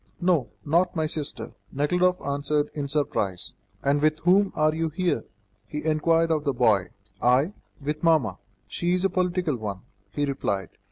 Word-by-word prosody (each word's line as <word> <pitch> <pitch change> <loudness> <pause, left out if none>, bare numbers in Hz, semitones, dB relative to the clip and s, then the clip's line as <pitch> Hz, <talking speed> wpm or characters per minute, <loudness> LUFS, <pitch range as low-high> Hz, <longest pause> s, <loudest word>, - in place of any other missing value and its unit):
"No, 175 -8 +2 0.2
not 170 +5 +2
my 160 -1 +1
sister," 155 -1 -3 0.2
Nekhludoff 180 +6 +2
answered 145 +1 0
in 145 -2 -3
surprise. 105 -11 -1 0.3
"And 140 +1 +2
with 155 0 +3
whom 190 +3 +4
are 155 0 +3
you 165 0 -1
here?" 170 -6 -1 0.4
he 150 +4 -5
inquired 165 +1 +2
of 155 -2 +1
the 140 -2 0
boy. 110 -7 +3 0.3
"I? 130 +10 +3 0.3
With 150 +1 -3
mamma; 155 - +2 0.3
she 175 +1 0
is 185 +1 0
a 195 - +2
political 180 -5 0
one," 100 -4 -5 0.3
he 145 +8 -1
replied. 100 -8 -2
150 Hz, 160 wpm, -26 LUFS, 140-170 Hz, 0.4 s, whom